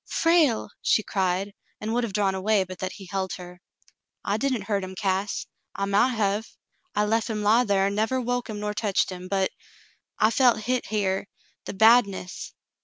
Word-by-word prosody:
"Frale! 320 Hz, -11 st, +2 dB
" -, -, -62 dB
she 215 Hz, -, +2 dB
cried, 190 Hz, +1 st, -1 dB, 0.3 s
and 220 Hz, +1 st, -3 dB
would 240 Hz, +1 st, +1 dB
have 230 Hz, -, -2 dB
drawn 195 Hz, -1 st, +1 dB
away 195 Hz, +1 st, +2 dB
but 185 Hz, 0 st, -10 dB
that 185 Hz, 0 st, -3 dB
he 195 Hz, -, -11 dB
held 190 Hz, -1 st, -2 dB
her. 180 Hz, -1 st, -10 dB, 0.6 s
"L 200 Hz, -, +1 dB
didn't 260 Hz, -5 st, 0 dB
hurt 200 Hz, -1 st, -1 dB
him, 185 Hz, 0 st, -7 dB
Cass. 195 Hz, +1 st, -1 dB, 0.3 s
I 200 Hz, -, -1 dB
mount 210 Hz, +6 st, +2 dB
hev. 210 Hz, 0 st, -1 dB, 0.4 s
I 210 Hz, 0 st, +2 dB
lef 225 Hz, +2 st, 0 dB
him 210 Hz, -1 st, -2 dB
lie 220 Hz, +4 st, +5 dB
thar 195 Hz, -2 st, +2 dB
an' 200 Hz, -, 0 dB
never 220 Hz, +5 st, 0 dB
woke 245 Hz, -1 st, -2 dB
him 210 Hz, -1 st, -5 dB
nor 210 Hz, 0 st, -2 dB
teched 205 Hz, -3 st, 0 dB
him, 180 Hz, 0 st, -7 dB
but 190 Hz, 0 st, 0 dB, 0.3 s
— -, -, -37 dB
I 215 Hz, -, +4 dB
felt 240 Hz, -2 st, +4 dB
hit 250 Hz, +2 st, -1 dB
here 200 Hz, -2 st, -1 dB, 0.2 s
— -, -, -40 dB
the -, -, -5 dB
badness." 200 Hz, -4 st, +3 dB
205 Hz, 200 wpm, -25 LUFS, 195-225 Hz, 0.6 s, lie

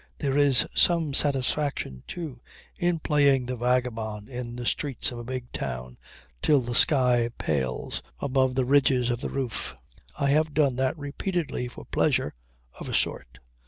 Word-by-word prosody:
There 140 Hz, -3 st, -1 dB
is 140 Hz, -3 st, +5 dB
some 165 Hz, -4 st, +2 dB
satisfaction 135 Hz, -, +1 dB
too 155 Hz, -9 st, -7 dB, 0.3 s
in 175 Hz, -2 st, 0 dB
playing 140 Hz, -5 st, +2 dB
the 125 Hz, +1 st, -4 dB
vagabond 115 Hz, -4 st, -2 dB
in 120 Hz, -2 st, -6 dB
the 120 Hz, 0 st, -6 dB
streets 135 Hz, 0 st, 0 dB
of 120 Hz, -, -7 dB
a -, -, -7 dB
big 125 Hz, 0 st, -6 dB
town 60 Hz, 0 st, -5 dB, 0.5 s
till 150 Hz, -2 st, +4 dB
the 120 Hz, -1 st, -4 dB
sky 125 Hz, -3 st, +5 dB
pales 65 Hz, -5 st, -2 dB, 0.2 s
above 130 Hz, -1 st, +1 dB
the 130 Hz, -1 st, +1 dB
ridges 130 Hz, -2 st, +3 dB
of 120 Hz, 0 st, -3 dB
the -, -, -3 dB
roofs. 130 Hz, -5 st, -4 dB, 0.4 s
I 140 Hz, -, +1 dB
have 155 Hz, +1 st, +1 dB
done 140 Hz, -4 st, +2 dB
that 130 Hz, +4 st, 0 dB
repeatedly 150 Hz, -1 st, -3 dB
for 120 Hz, -, -11 dB
pleasure -, -, 0 dB, 0.5 s
of -, -, -7 dB
a -, -, -1 dB
sort. -, -, 0 dB
130 Hz, 160 wpm, -26 LUFS, 120-145 Hz, 0.5 s, is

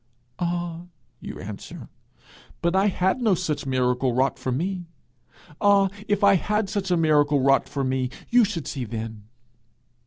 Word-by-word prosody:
'Ah,' 175 Hz, 0 st, -3 dB, 0.3 s
you -, -, -8 dB
answer, -, -, -8 dB, 0.7 s
'but 170 Hz, +2 st, 0 dB
I 195 Hz, +2 st, +4 dB
had 190 Hz, +5 st, +1 dB
no 215 Hz, -5 st, +3 dB
such 155 Hz, -5 st, -3 dB
miracle 125 Hz, -1 st, +1 dB
wrought 130 Hz, +2 st, +1 dB
for 130 Hz, -, -2 dB
me! 175 Hz, +6 st, -2 dB, 0.7 s
Ah, 200 Hz, -1 st, +5 dB, 0.2 s
if 205 Hz, 0 st, 0 dB
I 200 Hz, -1 st, +7 dB
had 210 Hz, +2 st, -1 dB
such 195 Hz, -2 st, -2 dB
a 175 Hz, -, +3 dB
miracle 150 Hz, -3 st, +3 dB
wrought 135 Hz, +1 st, +3 dB
for 140 Hz, -, -2 dB
me, 130 Hz, -1 st, 0 dB, 0.2 s
you 245 Hz, 0 st, +6 dB
should 185 Hz, -8 st, -2 dB
see 135 Hz, -, -4 dB
then!' 110 Hz, -2 st, -6 dB
170 Hz, 155 wpm, -24 LUFS, 130-195 Hz, 0.7 s, I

